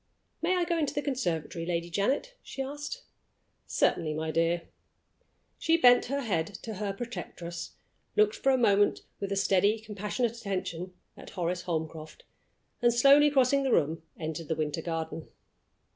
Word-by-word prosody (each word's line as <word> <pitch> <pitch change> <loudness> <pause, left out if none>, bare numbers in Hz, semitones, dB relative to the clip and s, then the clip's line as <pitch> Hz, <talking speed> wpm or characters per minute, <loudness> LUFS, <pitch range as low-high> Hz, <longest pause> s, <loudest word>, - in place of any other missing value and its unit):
"May 355 +3 +2
I 360 - +2
go 340 -1 0
into 295 -3 -1
the 290 - -1
conservatory, 175 - -2
Lady 170 0 -2
Janet?" 265 - 0
she 270 - -5
asked. 290 - -6 0.6
"Certainly, 155 -3 +1
my 160 +1 -2
dear." 165 +1 +1 1.0
She 330 0 +3
bent 245 -5 +6
her 280 +2 -2
head 180 -10 0 0.2
to 225 - -5
her 205 0 -2
protectress, 195 -6 -6 0.4
looked 425 +1 +4
for 270 - +2
a 260 - +4
moment 205 -4 +3 0.2
with 200 0 -4
a - - +1
steady, 200 +2 +3
compassionate 215 +2 -2
attention 185 -5 -4 0.2
at - - -11
Horace 180 0 -2
Holmcroft, 160 -2 -4 0.6
and, 240 0 +5
slowly 275 +5 +6
crossing 275 0 +3
the 270 -2 0
room, 160 -2 +2 0.2
entered 160 0 -5
the 160 - 0
winter 155 +1 -2
garden. 165 -1 -4
200 Hz, 155 wpm, -29 LUFS, 165-270 Hz, 1.0 s, bent